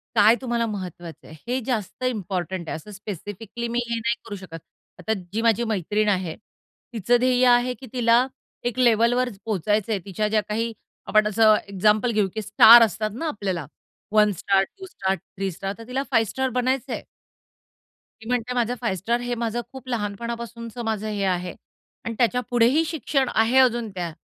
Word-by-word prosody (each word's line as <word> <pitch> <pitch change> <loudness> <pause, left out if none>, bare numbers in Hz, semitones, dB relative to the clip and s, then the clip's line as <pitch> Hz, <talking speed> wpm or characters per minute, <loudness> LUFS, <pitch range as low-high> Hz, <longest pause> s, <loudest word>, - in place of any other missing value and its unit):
काय 215 +2 +6
तुम्हाला 235 -2 0
महत्वाचं 180 -5 -7
आहे 160 - -12
हे 250 +2 0
जास्त 245 -1 -3
इम्पोर्टंट 190 -7 -3
आहे. - - -3
असं 160 +7 -10
स्पेसिफिकली 205 +4 -6
मी 235 +1 -1
हे 235 - 0
नाही 230 +1 0
करू 205 - -6
शकत. 180 -4 -9 0.4
आता 220 +5 -1 0.2
जी 225 - 0
माझी 230 0 +3
मैत्रीण 210 +2 0
आहे, 185 -5 -1 0.6
तिचं 235 +3 +2
ध्येय 255 0 +3
आहे, 245 +1 +4
की 250 +2 -12
तिला 240 0 +4 0.4
एक 245 +1 -2
लेव्हलवर 245 +1 +3 0.2
पोहचायचंय 210 +1 0
तिच्या 205 +2 -1
ज्या 215 0 +2
काही, 230 +2 -1 0.3
आपण 215 0 +4
असं 215 0 +5
एक्झाम्पल 210 +4 +2
घेऊ, 210 -3 +2
की 220 - -2
स्टार 220 +3 +8
असतात 215 +1 0
ना 325 +5 -3
आपल्याला 190 - -3 0.5
1 210 -1 +4
स्टार, 195 0 +2
2 380 - -11
स्टार, 195 - -2
3 195 0 -6
स्टार 195 +3 -5
तर 230 +1 -11
तिला 265 +2 -2
5 225 -2 +3
स्टार 265 +2 -1
बनायचंय. 260 0 -1 1.2
ती 225 - -11
म्हणते 250 0 -1
माझं 245 0 0
5 225 -5 0
स्टार 235 +6 0
हे 245 0 -2
माझं 235 0 -2
खूप 265 -1 -11
लहानपणापासूनचं 235 +2 -4
माझं 215 -1 -2
हे 205 -2 -2
आहे 180 -2 -1 0.5
आणि 230 - -3
त्याच्यापुढेही 245 +4 +2
शिक्षण 280 -4 -1
आहे, 225 +4 +3
अजून 240 -3 +3
त्या 175 -3 -4
225 Hz, 170 wpm, -24 LUFS, 200-240 Hz, 1.2 s, स्टार